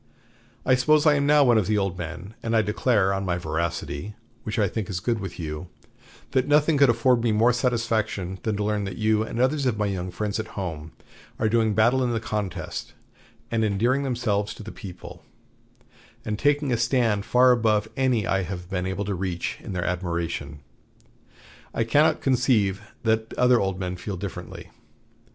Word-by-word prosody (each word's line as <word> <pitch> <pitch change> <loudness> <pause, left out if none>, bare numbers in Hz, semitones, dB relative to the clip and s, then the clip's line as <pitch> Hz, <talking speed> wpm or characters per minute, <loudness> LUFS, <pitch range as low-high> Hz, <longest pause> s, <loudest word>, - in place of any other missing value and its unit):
I 130 - +4
suppose 150 +4 +4
I 150 - +6
am 140 -1 +1
now 150 0 +6
one 120 -4 +5
of 105 - -1
the 105 0 +2
old 95 -3 0
men; 90 +4 -7
and 115 0 -1
I 110 - +4
declare, 105 -2 +2
on 95 0 -2
my 90 -2 -1
veracity, 85 +2 -3 0.3
which 105 - -4
I 105 -2 +3
think 105 +1 -4
is 90 -3 -2
good 115 +4 -1
with 95 -4 -6
you, 80 +1 -5 0.6
that 130 0 +1
nothing 150 +1 +4
could 140 -2 +6
afford 120 +1 +3
me 115 - +2
more 115 +3 +4
satisfaction 110 -6 -1
than 110 -2 -1
to 105 - -1
learn 105 -1 -1
that 95 -2 -6
you 110 0 +2
and 110 +1 -4
others 135 +2 +2
of 115 -4 0
my 105 - 0
young 95 -2 -3
friends 105 +3 -3
at 110 - -7
home 80 -5 -5 0.5
are 110 - +1
doing 110 -1 +2
battle 120 +5 +3
in 120 -1 0
the 115 - 0
contest, 105 -4 -4 0.6
and 115 -1 +1
endearing 115 +6 +1
themselves 115 -6 -1
to - - -10
the 110 - -8
people, 95 -4 -10 1.0
and 105 -1 -3
taking 145 +2 +2
a 120 - +2
stand 115 -5 +1
far 125 +3 +5
above 110 -3 +2
any 130 -6 +1
I 95 +2 +1
have 90 0 -6
been 90 -1 -1
able 95 +2 -3
to 100 - -2
reach 90 -2 -3
in - - -7
their 90 -1 -2
admiration. 85 -5 -3 1.1
I 115 - +2
cannot 150 +7 +3
conceive 120 -6 +2 0.2
that 110 0 0
other 125 -1 +4
old 95 -1 -1
men 90 -1 -3
feel 95 +1 -5
differently. 95 -1 -7
105 Hz, 190 wpm, -25 LUFS, 95-120 Hz, 1.1 s, I